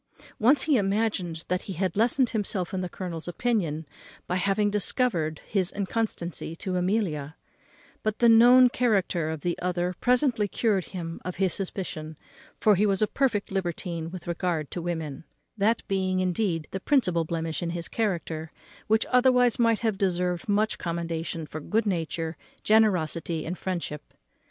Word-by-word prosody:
Once 260 +5 +5
he 300 -4 +3
imagined 195 -5 -1
that 180 0 0
he - - -2
had 185 0 -1
lessened 240 +4 +3
himself 200 -4 -2
in 185 - -1
the 180 - -3
colonel's 175 -4 -6
opinion 175 -6 -1 0.4
by 180 - -2
having 200 +2 +1
discovered 195 - 0
his 190 -3 0
inconstancy 195 -5 -2
to 185 +2 -3
Amelia; 180 -6 -1 0.7
but 215 0 -1
the 235 - +4
known 245 +3 +8
character 195 -10 +1
of 160 -2 -4
the 175 +2 -1
other 180 0 -1
presently 250 -4 +2
cured 200 -1 0
him 170 -3 -6
of 180 - -4
his 190 -1 +1
suspicion, 160 -5 -4 0.4
for 215 - +5
he 205 +2 +3
was 195 +1 +2
a - - +3
perfect 230 -8 0
libertine 175 -3 -3
with 180 -1 -8
regard 170 -3 -2
to 175 - -4
women; 160 -5 -4 0.3
that 215 +2 +1
being 190 -1 0
indeed 180 -3 0
the 190 - -3
principal 190 - +2
blemish 165 0 -3
in 170 - -2
his 170 0 -4
character, 170 -7 -2 0.4
which 220 +1 +3
otherwise 250 -2 +4
might 230 -2 +3
have 220 -4 0
deserved 180 -1 0
much 210 +2 +1
commendation 165 -1 -3
for 155 - -7
good 220 +9 0
nature, 165 -3 -2 0.3
generosity, 175 -7 +2
and 175 - -3
friendship. 170 -6 -5
185 Hz, 155 wpm, -27 LUFS, 170-215 Hz, 0.7 s, known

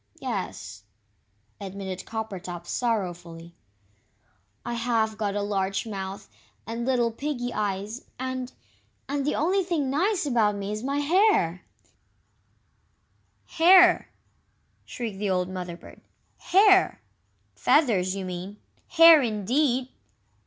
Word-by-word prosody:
"Yes," 85 - -5 0.8
admitted 190 -1 -7
Coppertop, 190 -6 -6
sorrowfully; 175 -7 -3 1.1
"I 240 - -3
have 230 -2 0
got 205 -2 -2
a 205 - -1
large 195 -1 -1
mouth 195 -2 -6 0.4
and 230 +2 -4
little 240 -3 +1
piggy 245 -1 -4
eyes, 205 +3 -3
and 260 0 -4 0.6
and 285 0 -2
the 295 - 0
only 365 +6 +1 0.2
nice 325 +9 0
thing 290 - -2
about 210 -3 +2
me 200 0 -4
is 210 0 -4
my 275 +3 -2
hair 290 - +2 0.9
" - - -24
"Hair!" 360 +1 +6 0.8
shrieked 225 -5 -6
the 205 -1 -1
old 180 -1 0
Mother 180 -2 -6
bird, - - -15 0.4
"HAIR!! 385 0 +4 0.5
Feathers, 200 - +2
you 195 -1 -5
mean. 185 +3 -6 0.3
Hair, 330 -2 +8
indeed! 250 +4 0
220 Hz, 110 wpm, -26 LUFS, 190-275 Hz, 1.1 s, Hair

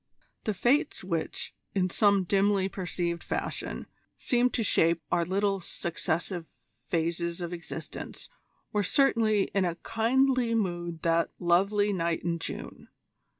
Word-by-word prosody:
The 215 - 0
Fates 280 - +2
which, 170 -3 -3 0.2
in 185 -2 +1
some 200 -1 +4
dimly 195 +1 +2
perceived 175 -3 -3
fashion, - - -3 0.3
seem 245 -1 +2
to 235 - -1
shape 170 -4 +3
our 170 - +3
little 195 +3 +1
successive 170 0 -3 0.4
phases 170 +1 -1
of 175 0 -4
existence, 170 -1 -7 0.5
were 210 - +2
certainly 220 -3 +3
in 195 -1 +3
a 175 -2 0
kindly 245 +1 +2
mood 175 -5 -2
that 165 0 +2
"lovely 200 +4 +3
night 170 -2 -1
in 170 0 -1
June." - - -6
190 Hz, 125 wpm, -29 LUFS, 170-210 Hz, 0.5 s, some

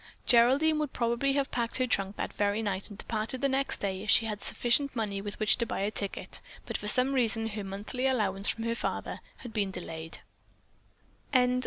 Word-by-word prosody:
Geraldine 270 +6 +5
would 300 -3 -2
probably 235 +3 +1
have 275 -1 0
packed 235 -1 -1
her 255 - +2
trunk 195 -4 0
that - - -4
very 205 +2 0
night 195 -1 -2
and 205 - -10
departed 225 +4 -3
the 280 - +3
next 270 0 0
day 190 -1 -3
if 210 - -6
she 225 - +5
had 210 -2 -3
had - - -10
sufficient 255 +3 +2
money 205 -4 -2
with 205 0 -3
which 215 +2 +3
to 235 - +2
buy - - -2
a 205 +2 0
ticket, 200 -2 -2 0.2
but - - -5
for 210 - -2
some 255 +5 +4
reason 225 -3 +2
her 210 -1 -4
monthly 205 +7 -3
allowance 205 -6 +2
from 225 - -1
her 230 0 0
father 235 - -3 0.2
had 240 -3 -8
been 205 -3 0
delayed. 165 -3 -6
225 Hz, 205 wpm, -30 LUFS, 200-255 Hz, 0.2 s, Geraldine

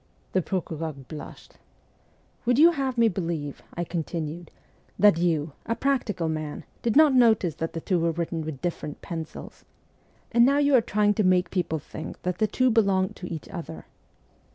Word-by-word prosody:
The 185 - +2
procureur 165 -3 -3
blushed. 140 +3 -11 0.9
'Would 245 0 +4
you 330 +4 +8
have 270 -5 -2
me 230 -1 +5
believe,' 165 -7 -3
I 175 - -1
continued, 165 -1 -4 0.3
' - - -35
that 205 -5 +5
you, 160 -3 +1 0.2
a 230 - 0
practical 235 -11 0
man, 155 -2 -4 0.2
did 230 - 0
not 305 -2 +7
notice 220 -9 +4
that 165 -1 -3
the 165 - -4
two 175 -2 0
are - - +2
written 165 0 -3
in 155 - -4
quite 155 -4 -6
different 165 -4 -4
pencils? 165 -3 -7 0.7
And 235 0 +5
now 275 +3 +4
you 290 -1 +3
are 255 - +7
trying 210 -1 +2
to 215 - +1
make 185 -1 +3
people 175 -4 -1
think 155 +1 -8
that 180 0 -2
the 215 - +3
two 255 +4 +2
belong 195 -4 +3
to 180 - -9
each 160 -3 -6
other 160 - -7
180 Hz, 180 wpm, -26 LUFS, 160-225 Hz, 0.9 s, you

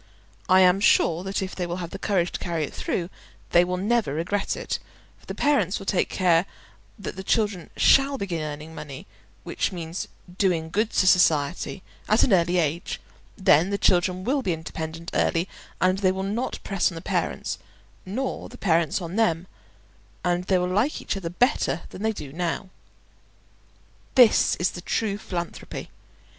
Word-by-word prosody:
I 185 0 +7
am 185 +1 +5
sure 170 -4 +3
that 195 0 -2
if 190 - -5
they 180 -2 -2
will 175 - -3
have 175 -2 -5
the - - -6
courage 180 -4 +1
to - - -4
carry 170 -3 -2
it 145 - -5
through 175 +1 -2 0.4
they 175 - +6
will 180 +1 -2
never 210 -5 +1
regret 190 +5 -1
it; - - -3 0.4
for - - -23
the - - -5
parents 285 -9 +2
will 195 - -9
take 195 - +1
care 180 -1 +3 0.5
that - - -6
the 190 - -5
children 205 -4 0
shall 275 0 +5
begin 180 -8 -3
earning 150 +1 -6
money 145 -4 -8 0.4
(which - - -1
means 170 -1 -5 0.3
"doing 165 -5 +1
good" 215 +4 +1
to 185 - +2
society) 175 0 +3 0.3
at 215 - +5
an 225 - +3
early 175 0 +3
age; 165 0 -1 0.4
then 175 -1 +4
the 200 - 0
children 185 -1 +2
will 270 +6 +1
be 185 -8 0
independent 160 +1 -6
early, 170 +3 +1 0.3
and 185 +1 +2
they 190 -2 +3
will 190 0 -3
not 215 +6 -2
press 195 -3 +1
on - - -9
the 165 - -6
parents, - - -2 0.4
nor 255 +8 -4
the - - -12
parents 170 -1 +1
on 170 +4 -5
them, 175 -6 +2 0.8
and 175 0 +1
they 185 - +3
will 180 - +1
like 210 +11 +1
each - - -3
other 185 -4 -4
better 180 - +1
than 185 - -9
they 220 +1 +1
do 145 -10 -8
now. 175 +2 -3 1.4
This 245 -4 +6
is 175 - 0
the 175 - -8
true 205 +2 -1
philanthropy. 175 -4 -6
180 Hz, 175 wpm, -25 LUFS, 170-200 Hz, 1.4 s, I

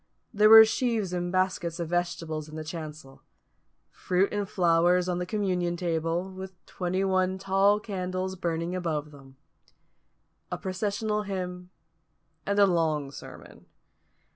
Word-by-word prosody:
There 210 0 +5
were 220 0 +11
sheaves 220 -5 -1
and 175 0 -2
baskets 185 -3 -1
of 170 -2 -3
vegetables 165 -3 -2
in 155 - -10
the 155 - -5
chancel; 155 -4 -8 0.7
fruit 185 +2 0
and 205 -1 -2
flowers 175 -1 +3
on 180 -1 -1
the 180 - -3
communion 180 -4 -1
table, 165 +1 -1
with 190 0 -8
twenty 185 +1 -2
one 185 -1 +1
tall 195 +2 +2
candles 185 -2 -4
burning 170 0 -2
above 155 -4 -3
them; 135 -2 -16 1.1
a - - -2
processional 210 +3 -2
hymn; 180 -3 -5 0.8
and 200 0 0
a 200 - +7
long 160 -6 0
sermon. - - -12
180 Hz, 135 wpm, -27 LUFS, 165-195 Hz, 1.1 s, were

